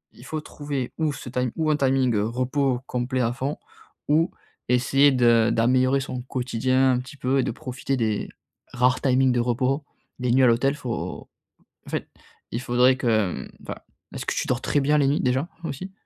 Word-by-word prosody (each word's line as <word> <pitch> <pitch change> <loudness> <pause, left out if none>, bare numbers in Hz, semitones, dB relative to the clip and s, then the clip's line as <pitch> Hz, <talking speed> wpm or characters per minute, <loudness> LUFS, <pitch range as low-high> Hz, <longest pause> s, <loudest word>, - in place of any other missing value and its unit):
il 120 - -14
faut 155 - -3
trouver 145 -4 -5
où 155 -2 +1
ce 130 - -9
tim 125 +1 -1
ou 160 -1 0
un - - +3
timing 130 -3 +2
repos 125 +4 0
complet 125 +1 -2
à 120 0 +1
fond 135 +3 -3 0.5
ou 160 +3 +3 0.4
essayer 135 +3 +4
de 120 -3 +4
d'améliorer 130 +3 +3
son 130 -2 -4
quotidien 130 +1 +1
un 125 - +1
petit 135 +4 -10
peu 135 +1 +1
et - - +2
de - - -1
profiter 130 +3 -4
des 110 -4 -1 0.4
rares 125 +1 +2
timings 130 -1 +3
de 120 - +1
repos, 130 +4 0 0.4
des 125 -1 0
nuits 130 +2 +4
à - - +7
l'hôtel. 125 +4 +2
Faut 125 -5 -5 0.6
en - - -11
fait - - -3 0.4
il 115 - -3
faudrait 125 +1 +4
que, 110 -7 +1
mmh, - - -14
enfin - - -5 0.4
est-ce - - -5
que - - -1
tu - - -1
dors 125 0 0
très 145 - +1
bien 145 +2 +3
les 145 - +3
nuits 140 +2 +2
déjà 130 +5 +1 0.2
aussi? 180 +6 -5
130 Hz, 195 wpm, -24 LUFS, 125-135 Hz, 0.6 s, à